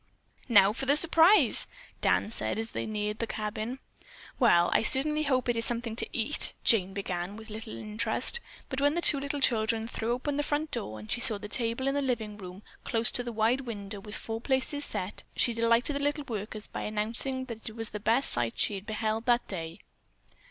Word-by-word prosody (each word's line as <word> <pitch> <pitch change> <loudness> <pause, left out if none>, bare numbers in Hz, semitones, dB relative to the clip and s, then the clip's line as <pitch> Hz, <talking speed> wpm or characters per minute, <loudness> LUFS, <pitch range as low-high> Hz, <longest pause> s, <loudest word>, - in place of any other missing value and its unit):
"Now 205 -3 +6
for 270 +3 -4
the 285 +2 +5
surprise!" 330 - +6 0.3
Dan 210 - +4
said - - -2
as 225 +1 -3
they - - -4
neared 210 0 -3
the 230 - -2
cabin. 215 +4 -4 0.6
"Well, 175 -9 +4
I - - +4
certainly 300 +5 +2
hope 260 -4 +1
it 240 - +1
is 230 - -1
something 230 -1 -1
to - - +1
eat," 245 +6 +1
Jane 195 -4 +3
began, 190 0 -4
with 220 0 -10
little 220 +1 -6
interest, 215 - -2 0.3
but 265 0 -4
when 290 +2 +3
the 345 - 0
two 280 -4 +4 0.2
children 225 -2 +2
threw 230 0 -2
open 280 +3 -2
the - - +2
front 295 +1 -2
door 110 - -3
and 105 - -9
she 240 - +1
saw 220 -3 +5
the 210 - -8
table 235 +4 -1
in 275 - +1
the 285 - 0
living 235 -6 -2
room 185 +1 -10 0.2
close 230 0 +1
to 245 - +1
the 240 - -5
wide 225 +4 +1
window 205 -5 -6
with 210 +1 -7
four 225 0 -5
places 275 +3 -1
set, 185 +3 -5
she 235 - +2
delighted 230 +4 +2
the - - -1
little 290 +1 -1
workers 215 -2 -5
by - - -6
announcing 230 +5 -2
that 230 -3 -7
it 220 - -12
was 225 -1 -4
the 210 - -5
best 230 +6 +2
sight 120 -1 -1
she - - +2
had 195 +2 -7
beheld 220 +1 -2
that 240 0 +2
day. 165 -3 -5
230 Hz, 210 wpm, -29 LUFS, 210-260 Hz, 0.6 s, Now